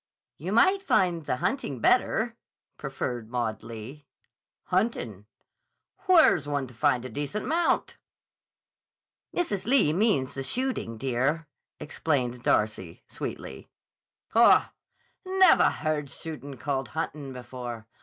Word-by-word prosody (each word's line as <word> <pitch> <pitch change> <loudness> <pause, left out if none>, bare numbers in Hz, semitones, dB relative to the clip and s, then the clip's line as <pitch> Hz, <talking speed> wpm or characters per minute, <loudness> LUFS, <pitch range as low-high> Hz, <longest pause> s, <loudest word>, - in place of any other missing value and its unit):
"You 175 +7 -4
might 375 - +4
find 175 - +1
the 125 - +1
hunting 145 - -2
better," - - +2 0.4
proffered 120 -3 -4
Maud 120 -3 -2
Lee. 115 +6 -9 0.6
"Huntin'? 150 - -1 0.8
Where's 320 - +5
one 145 -2 -1
to 125 - -13
find 120 +2 +1
a - - -3
decent 145 - -4
mount?" 335 +2 0 1.3
"Mrs. 270 - -2
Lee 240 - +4
means 185 - +1
the 135 - -4
shooting, 245 - -2
dear," 135 +6 0 0.3
explained 135 -5 -1
Darcy, 105 -7 0
sweetly. 65 - -7 0.6
"Haw! 230 +1 +5 0.5
Nevah 375 -2 +5
heard 150 -3 -2
shootin' 145 -1 -7
called 135 0 -2
huntin' 140 +5 -4
before. 125 -3 -7
140 Hz, 110 wpm, -27 LUFS, 120-190 Hz, 1.3 s, Where's